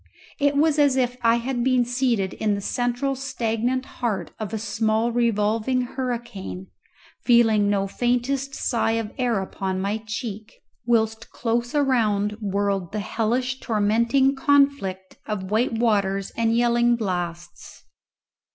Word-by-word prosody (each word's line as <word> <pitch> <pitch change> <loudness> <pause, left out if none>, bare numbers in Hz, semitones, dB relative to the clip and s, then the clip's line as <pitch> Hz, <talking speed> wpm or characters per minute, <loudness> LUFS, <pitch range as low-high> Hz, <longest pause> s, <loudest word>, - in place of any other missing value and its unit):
It 285 -1 +2
was 305 0 +3
as 280 -2 +4
if 250 -1 +1
I 230 0 +4
had 240 +1 -2
been 255 -1 +3
seated 245 -6 0
in 210 -2 0
the - - -3
central 245 +5 -1
stagnant 255 -1 -2
heart 230 -6 -3
of 215 -2 -4
a 220 - -2
small 220 +1 0
revolving 230 +1 +1
hurricane, 240 -7 -5 0.5
feeling 225 -4 +4
no 200 -1 +1
faintest 250 +6 -1
sigh 225 -2 0
of 225 -2 -2
air 240 -5 +1
upon 190 0 -3
my 200 +3 -1
cheek, 215 -1 -6 0.3
whilst 225 -2 +1
close 240 +2 -2
around 220 -8 +2
whirled 200 -2 -1
the 210 - -1
hellish 240 +5 -1
tormenting 235 +5 +2
conflict 275 -10 +1
of 195 -3 -4
white 230 +3 +1
waters 200 -4 +1
and 230 0 +1
yelling 240 0 +3
blasts. 175 -5 -5
230 Hz, 135 wpm, -24 LUFS, 210-250 Hz, 0.5 s, as